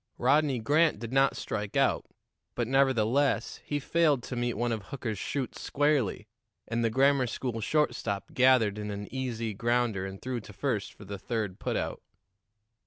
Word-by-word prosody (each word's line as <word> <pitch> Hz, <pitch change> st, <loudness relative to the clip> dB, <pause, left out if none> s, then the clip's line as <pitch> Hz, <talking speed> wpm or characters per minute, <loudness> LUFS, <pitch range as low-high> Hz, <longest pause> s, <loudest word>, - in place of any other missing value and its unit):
Rodney 145 Hz, -3 st, +3 dB
Grant 150 Hz, +5 st, +3 dB
did 115 Hz, +3 st, -7 dB
not 135 Hz, 0 st, +3 dB
strike 105 Hz, -1 st, -3 dB
out, -, -, +2 dB, 0.5 s
but, 120 Hz, -2 st, -1 dB
nevertheless, 135 Hz, 0 st, +2 dB
he 145 Hz, -, -2 dB
failed 150 Hz, -3 st, +2 dB
to 125 Hz, -, -5 dB
meet 120 Hz, -1 st, -1 dB
one 120 Hz, +2 st, 0 dB
of 110 Hz, -3 st, -3 dB
Hooker's 110 Hz, -4 st, -4 dB
shoots 135 Hz, -3 st, -3 dB
squarely, 140 Hz, -8 st, +1 dB, 0.4 s
and 115 Hz, +1 st, -1 dB
the 115 Hz, -, +3 dB
grammar 135 Hz, +2 st, +3 dB
school 115 Hz, -1 st, -3 dB
shortstop 115 Hz, -7 st, -1 dB
gathered 125 Hz, -5 st, +4 dB
in 105 Hz, 0 st, -4 dB
an 100 Hz, 0 st, -5 dB
easy 115 Hz, -4 st, -2 dB
grounder 115 Hz, -3 st, 0 dB
and 95 Hz, 0 st, -8 dB
threw 130 Hz, -1 st, -3 dB
to 105 Hz, -1 st, -12 dB
first 110 Hz, -2 st, -2 dB
for 105 Hz, -, -14 dB
the 100 Hz, 0 st, -6 dB
third 105 Hz, -4 st, -3 dB
put -, -, -1 dB
out. -, -, -3 dB
120 Hz, 170 wpm, -29 LUFS, 105-135 Hz, 0.5 s, gathered